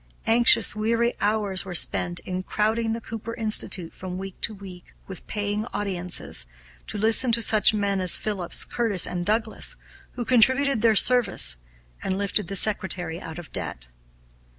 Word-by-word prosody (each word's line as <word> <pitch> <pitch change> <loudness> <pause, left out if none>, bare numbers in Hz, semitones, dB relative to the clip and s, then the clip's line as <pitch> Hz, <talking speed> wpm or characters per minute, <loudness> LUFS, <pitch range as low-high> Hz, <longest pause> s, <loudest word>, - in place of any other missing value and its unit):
Anxious, 230 -2 +4
weary 230 +2 0
hours 205 -3 -1
were 185 -2 -7
spent 175 +1 +3
in 185 0 -5
crowding 220 +3 -1
the 230 - -5
Cooper 225 +1 -7
Institute, 215 -6 +1
from 185 -1 -8
week 195 0 -9
to - - +2
week, 190 -3 -13
with 190 -3 -9
paying 210 +1 -3
audiences, 180 - -2 0.4
to - - -5
listen 225 +4 +3
to 230 - +2
such 215 -3 +4
men 200 -2 -2
as 185 - +3
Phillips, 195 -5 -4
Curtis, 220 -7 +2
and 175 -1 -4
Douglass, 220 +3 -1 0.4
who 240 - -5
contributed 260 +1 +3
their 225 -2 +3
services, 245 - +4 0.4
and 190 - -3
lifted 200 -1 -2
the 195 - -6
secretary 185 -4 -1
out 160 0 -9
of 175 -2 -10
debt. - - -6
205 Hz, 155 wpm, -24 LUFS, 185-225 Hz, 0.4 s, Anxious